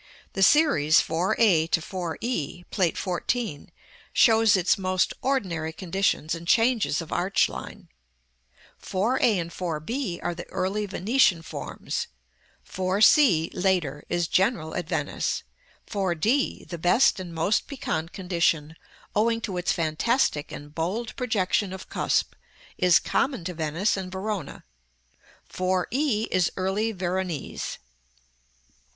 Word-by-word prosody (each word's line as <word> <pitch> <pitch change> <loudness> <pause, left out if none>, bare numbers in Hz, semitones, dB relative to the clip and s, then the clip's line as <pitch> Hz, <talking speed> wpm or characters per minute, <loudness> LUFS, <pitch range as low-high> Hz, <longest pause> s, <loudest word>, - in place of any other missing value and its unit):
The 195 - -3
series 190 - +5
4 175 +6 0
a 175 -8 +4
to 165 - +2
4 175 -1 -5
e, 180 - -3
Plate 180 -5 +1
XIV., 185 -2 -2 0.4
shows 225 -3 +5
its 185 0 +3
most 185 -1 0
ordinary 180 -13 -1
conditions 175 -2 -1
and 170 0 -6
changes 225 - +2
of 160 - -13
arch 185 +3 +2
line: - - -9 0.9
4 215 +8 0
a 225 -6 +3
and 170 -1 -4
4 170 -4 -3
b 195 - -3
are 175 - -1
the 170 - -8
early 195 +3 -2
Venetian 195 -3 +2
forms; - - -5 0.6
4 185 +1 -2
c, 200 - +5
later, 175 -7 0
is 175 -1 0
general 185 -5 +1
at 175 -2 -4
Venice; - - -2 0.4
4 195 -5 -1
d, 235 - 0
the 170 - -7
best 180 +7 +4
and 180 -2 -7
most 165 +6 0
piquant 170 - -3
condition, 170 -4 0 0.4
owing 225 +2 +2
to 200 -5 -4
its 180 - 0
fantastic 160 - 0
and 145 0 -9
bold 190 +9 -3
projection 205 -5 0
of 190 0 -8
cusp, - - 0 0.4
is 180 -2 +5
common 265 -9 -1
to 180 +1 -4
Venice 165 +5 0
and 190 -2 -5
Verona; 190 -4 -4 0.8
4 185 0 -1
e 250 -5 0
is 180 -2 +2
early 195 +4 0
Veronese. 185 -4 -3
185 Hz, 135 wpm, -26 LUFS, 170-215 Hz, 0.9 s, series